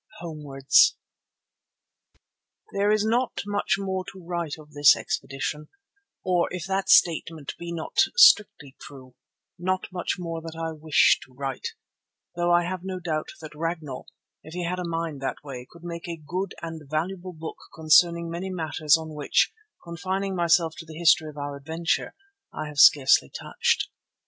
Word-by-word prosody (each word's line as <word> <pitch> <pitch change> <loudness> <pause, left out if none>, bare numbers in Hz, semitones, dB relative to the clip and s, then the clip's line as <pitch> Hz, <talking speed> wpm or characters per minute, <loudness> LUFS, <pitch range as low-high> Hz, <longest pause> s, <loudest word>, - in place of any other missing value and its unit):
HOMEWARDS 145 -5 +3 1.8
There 200 +1 +2
is 215 0 +2
not 240 +3 0
much 205 -3 0
more 190 -1 -3
to 190 -3 -14
write 170 -3 -3
of 150 -1 -15
this 145 -2 +6
expedition, 135 +3 -4 0.5
or 180 -2 +2
if 180 -1 -5
that 195 0 -2
statement 165 -6 +3
be 170 0 -6
not 165 -2 -6 0.2
strictly 205 - +5
true, 130 -3 -12 0.5
not 185 +1 -1
much 180 -2 -2
more 165 -2 -5
that 165 0 -8
I 165 0 -2
wish 155 -1 +3
to 130 - -23
write, 135 -1 -5 0.6
though 175 0 +1
I 175 0 +4
have 185 +1 -4
no 190 -1 -4
doubt 160 -3 -3
that 155 -1 -9
Ragnall, 160 -4 -5 0.3
if 160 +2 -11
he 180 - -3
had 180 +2 -2
a - - -3
mind 165 -4 -3
that 135 +2 -4
way, 130 -3 -8
could 170 0 -17
make 170 0 -6
a 170 -1 -5
good 180 +6 -4
and 165 -1 -6
valuable 180 +4 -3
book 160 0 -8 0.2
concerning 170 +2 +4
many 170 +3 -5
matters 160 -4 +2
on 160 -1 -8
which, 150 -1 +1 0.3
confining 190 +3 -3
myself 170 -2 +3
to 165 - -8
the 155 -1 -10
history 160 -1 +4
of 150 - -13
our 145 0 -4
adventure, 160 +4 -2 0.4
I 155 - -5
have 145 -1 -6
scarcely 135 - +6
touched. - - -1
165 Hz, 160 wpm, -25 LUFS, 150-180 Hz, 1.8 s, this